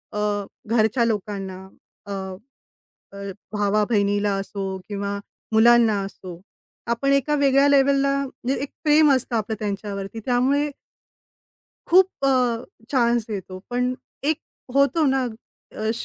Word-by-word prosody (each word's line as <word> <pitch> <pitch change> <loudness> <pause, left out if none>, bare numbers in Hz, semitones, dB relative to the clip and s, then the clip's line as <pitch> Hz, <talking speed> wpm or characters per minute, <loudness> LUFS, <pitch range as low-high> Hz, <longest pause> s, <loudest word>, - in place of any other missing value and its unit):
अ, - - -1 0.5
घरच्या 230 +1 +3
लोकांना, 205 -3 -3 0.5
अ, 200 - -5 1.0
अ, 200 0 -6 0.2
भावा-बहिणीला 205 0 +1
असो 195 0 -6 0.3
किंवा 200 -1 -3 0.4
मुलांना 225 -1 +5
असो. 190 -1 -9 0.6
आपण 275 +4 +1
एका 275 +2 +2
वेगळ्या 275 0 +5
लेवलला 275 0 +4 0.4
एक 275 0 -3
प्रेम 300 0 +5
असतं 255 -2 0
आपलं 220 0 -2
त्यांच्यावरती, 200 0 -4
त्यामुळे 270 +4 +2 1.2
खूप 370 +2 +6 0.2
अ, 250 -3 +2 0.3
चान्स 240 -4 +2
देतो. 190 -3 -6
पण 250 +1 0 0.3
एक 310 +1 +1 0.4
होतो 280 +3 +3
ना 270 -1 +2 0.5
अ, 220 +1 -1
235 Hz, 110 wpm, -23 LUFS, 205-275 Hz, 1.2 s, खूप